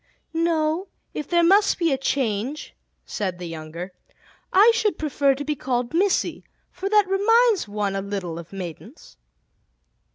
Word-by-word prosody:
"No; 330 +2 0 0.3
if 300 - -5
there 345 -1 +3
must 395 +4 +4
be 335 -3 +1
a - - +3
change," 260 0 -2 0.3
said 190 -4 -3
the 180 - -7
younger, 165 +2 -7 0.6
"I 415 +5 +7
should 435 -3 0
prefer 280 -2 +1
to 285 +2 -6
be 300 +1 -1
called 250 -1 -2
'Missy,' 380 +3 +1 0.3
for 390 - -4
that 420 -1 +5
reminds 430 - +3
one 205 -1 -2
a 195 - -1
little 190 -4 -4
of 170 - -11
maidens." 180 - -9
285 Hz, 150 wpm, -23 LUFS, -, 0.6 s, I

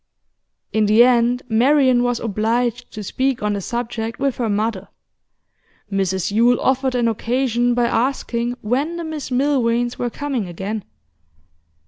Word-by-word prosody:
In 215 -1 +2
the 215 +3 +6
end, 245 0 +3
Marian 255 +2 +4
was 245 -1 0
obliged 235 +3 -1
to 210 - -6
speak 260 +3 -1
on 210 0 +1
the 200 - -3
subject 230 +1 -4
with 275 -2 -1
her 235 -3 -1
mother. 205 -1 -1 1.0
Mrs 190 -1 -1
Yule 235 +3 +3
offered 265 0 +1
an 240 -1 +2
occasion 240 +1 0
by 240 -1 +2
asking 240 -1 -1
when 270 +10 -1
the 340 - -4
Miss 310 -4 -5
Milvains 245 -3 +1
were 245 - -1
coming 265 -6 -3
again. 195 +5 -5
240 Hz, 140 wpm, -20 LUFS, 220-255 Hz, 1.0 s, the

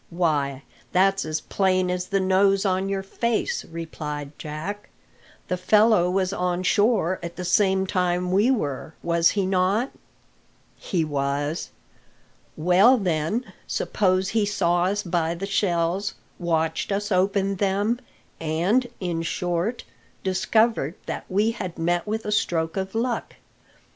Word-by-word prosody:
"Why, 145 -6 0 0.3
that's 195 0 +3
as 155 0 -2
plain 185 -2 +1
as 180 0 -2
the 195 0 +1
nose 195 +1 +3
on 190 0 +1
your 195 -1 -2
face," 235 - -1
replied 150 -3 -6
Jack; 160 +8 -6 0.6
"the 180 - -1
fellow 210 -1 +4
was 185 0 0
on 180 -1 -1
shore 205 -3 +2
at 170 0 -6
the 180 - -5
same 190 +1 +3
time 180 -1 0
we 205 +6 +4
were, 155 - -2
was 170 -1 +3
he 195 - +2
not?" 190 +7 +1 0.8
"He 170 -4 -1
was." 145 +2 -2 0.9
"Well, 185 +10 +5
then, 185 +4 -1
suppose 185 -1 +1
he 220 0 +1
saw 175 -4 +1
us 205 +2 0
buy 170 -2 0
the 185 +3 -4
shells, 190 -1 0 0.2
watched 165 0 0
us 205 +1 -1
open 195 +1 +1
them, 205 +5 +1 0.4
and, 175 +11 +1
in 175 -3 -2
short, 175 +6 -2 0.4
discovered 190 - +1
that - - -5
we 210 +4 +2
had 185 -6 -6
met 175 +3 0
with 220 +1 -2
a 210 - -2
stroke 165 -5 0
of 190 +1 -3
luck. 235 0 -2
185 Hz, 135 wpm, -24 LUFS, 170-200 Hz, 0.9 s, Well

